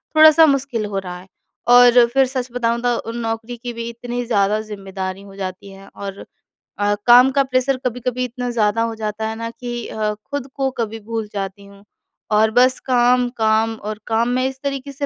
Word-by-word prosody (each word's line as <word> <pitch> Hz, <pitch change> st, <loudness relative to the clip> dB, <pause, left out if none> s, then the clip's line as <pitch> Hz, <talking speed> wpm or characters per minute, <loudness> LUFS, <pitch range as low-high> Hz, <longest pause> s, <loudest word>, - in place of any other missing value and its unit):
थोड़ा-सा 315 Hz, +1 st, +8 dB
मुश्किल 275 Hz, -6 st, 0 dB
हो 200 Hz, -1 st, -3 dB
रहा 180 Hz, -2 st, -7 dB
है। 185 Hz, -, -15 dB, 0.5 s
और 245 Hz, 0 st, +7 dB
फिर 270 Hz, 0 st, +4 dB
सच 255 Hz, -1 st, -3 dB
बताऊँ 235 Hz, -1 st, -1 dB
तो 240 Hz, -2 st, -1 dB
नौकरी 225 Hz, +1 st, -4 dB
की 240 Hz, +1 st, -6 dB
भी 230 Hz, 0 st, -5 dB
इतनी 245 Hz, +1 st, -5 dB
ज़्यादा 210 Hz, -2 st, +1 dB
ज़िम्मेदारी 195 Hz, -2 st, -6 dB
हो 195 Hz, -1 st, -13 dB
जाती 190 Hz, 0 st, -6 dB
है 195 Hz, 0 st, -14 dB
और 200 Hz, 0 st, -7 dB, 0.6 s
अ, 205 Hz, 0 st, +2 dB
काम 250 Hz, +2 st, +8 dB
का 275 Hz, +1 st, +3 dB
प्रेशर 255 Hz, 0 st, 0 dB
कभी-कभी 250 Hz, +1 st, -2 dB
इतना 245 Hz, 0 st, -5 dB
ज़्यादा 225 Hz, -1 st, +1 dB
हो 230 Hz, -1 st, -3 dB
जाता 215 Hz, 0 st, -3 dB
है 220 Hz, -, -4 dB
ना 230 Hz, 0 st, -5 dB
कि 240 Hz, 0 st, -6 dB
अ, 215 Hz, -1 st, -2 dB, 0.2 s
खुद 285 Hz, -2 st, -3 dB
को 270 Hz, -1 st, 0 dB
कभी 225 Hz, -1 st, -3 dB
भूल 220 Hz, 0 st, -5 dB
जाती 200 Hz, 0 st, -5 dB
हूँ 200 Hz, 0 st, -17 dB, 0.5 s
और 215 Hz, +1 st, +4 dB
बस 250 Hz, +3 st, +4 dB
काम, 250 Hz, -1 st, +2 dB
काम 225 Hz, -1 st, +1 dB
और 215 Hz, 0 st, -6 dB
काम 230 Hz, +1 st, +1 dB
में 255 Hz, +1 st, +1 dB
इस 265 Hz, 0 st, -7 dB
तरीके 280 Hz, 0 st, -4 dB
से 285 Hz, +1 st, -4 dB
230 Hz, 195 wpm, -20 LUFS, 210-250 Hz, 0.6 s, थोड़ा-सा